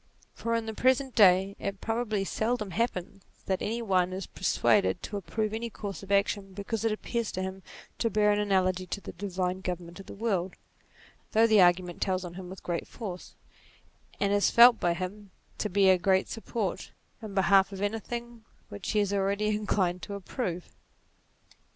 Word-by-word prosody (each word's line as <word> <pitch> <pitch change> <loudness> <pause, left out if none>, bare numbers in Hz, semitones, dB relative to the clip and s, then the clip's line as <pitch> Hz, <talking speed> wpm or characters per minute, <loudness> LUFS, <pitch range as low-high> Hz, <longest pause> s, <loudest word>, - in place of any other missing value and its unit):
For 230 0 -2
in 230 -1 -1
the 220 - -4
present 260 +3 +2
day 195 -1 +5
it 200 -1 -4
probably 225 -3 -1
seldom 220 -1 -1
happens 200 -2 -2 0.2
that 190 -1 -1
any 230 +2 -2
one 185 -3 +1
is 190 0 -4
persuaded 190 0 +1
to 210 - -5
approve 215 +3 -2
any 230 +1 -3
course 205 -3 -6
of 195 0 -9
action 200 -1 +1
because 205 +3 -4
it 225 - +2
appears 230 +1 -2
to 185 - -2
him 190 0 -5 0.4
to 230 - +1
bear 210 0 +3
an 205 - +2
analogy 185 -2 +1
to 200 - -4
the 195 - -8
divine 185 0 -3
government 175 -1 -5
of 195 - -11
the - - -9
world, 195 -4 -1 0.8
though 225 +1 +6
the 215 -3 +5
argument 175 0 +3
tells 185 -1 0
on 175 - -7
him 180 0 -8
with 190 0 -10
great 170 -1 -3
force, 185 -6 -8 0.8
and 200 0 +1
is 205 0 +3
felt 235 0 +8
by 175 -1 +1
him 195 +3 -6 0.3
to 210 - -1
be 195 +1 +3
a 185 - +3
great 190 +2 +2
support, 225 -4 -4 0.3
in 210 -3 -8
behalf 195 +1 +4
of 195 - -7
anything 230 +3 -4 0.3
which 205 -1 -5
he 210 - +3
is 200 -1 -1
already 200 +2 +1
inclined 195 -4 0
to 200 - -6
approve. 185 -3 -5
200 Hz, 180 wpm, -29 LUFS, 185-220 Hz, 0.8 s, felt